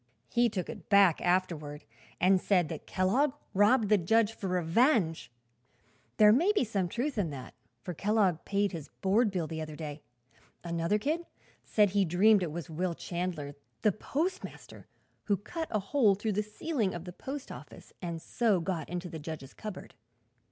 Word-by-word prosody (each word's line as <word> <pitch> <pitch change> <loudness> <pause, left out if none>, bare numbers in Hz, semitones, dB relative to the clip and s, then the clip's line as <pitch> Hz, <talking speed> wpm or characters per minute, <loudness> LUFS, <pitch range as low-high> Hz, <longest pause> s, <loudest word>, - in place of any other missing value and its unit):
"He 240 0 +3
took 190 -4 -3
it - - -9
back, 200 -5 +5
afterward, 170 -5 -1 0.4
and 185 +1 +4
said 180 -6 +2
that 160 - -7
Kellogg 250 +10 +2 0.2
robbed 210 +3 +4
the 210 -2 +5
judge 225 +5 +2
for 200 - -5
revenge. 180 - +2 0.9
There 210 -1 +8
may 340 - +4
be 410 - +2
some 200 -6 -1
truth 245 - -2
in 180 -5 0
that, 135 -3 -8 0.3
for 180 - -4
Kellogg 195 -2 +1
paid 200 0 0
his 160 -5 -7
board 210 +4 +3
bill 180 -4 -2
the 160 0 -5
other 155 -1 -6
day. 150 -1 -7 0.6
Another 170 +3 0
kid 315 +9 -2 0.4
said 210 -3 +3
he 200 0 +3
dreamed 190 +4 +4
it 170 -4 -2
was 165 -2 -5
Will 170 +2 -2
Chandler, 170 -6 -4 0.3
the 215 - +5
postmaster, 330 - -4 0.4
who 200 -2 +2
cut 320 - -5
a 215 - 0
hole 205 +1 +3
through 210 +2 -2
the 210 - +1
ceiling 215 - -2
of 175 0 -7
the 180 - -8
post 275 +7 -7
office - - -12
and 170 -2 -4
so 215 +2 +1
got 165 -3 -3
into 180 +1 -4
the 160 -2 -7
judge's 150 -3 -7
cupboard. 215 -4 -8
190 Hz, 175 wpm, -30 LUFS, 170-220 Hz, 0.9 s, There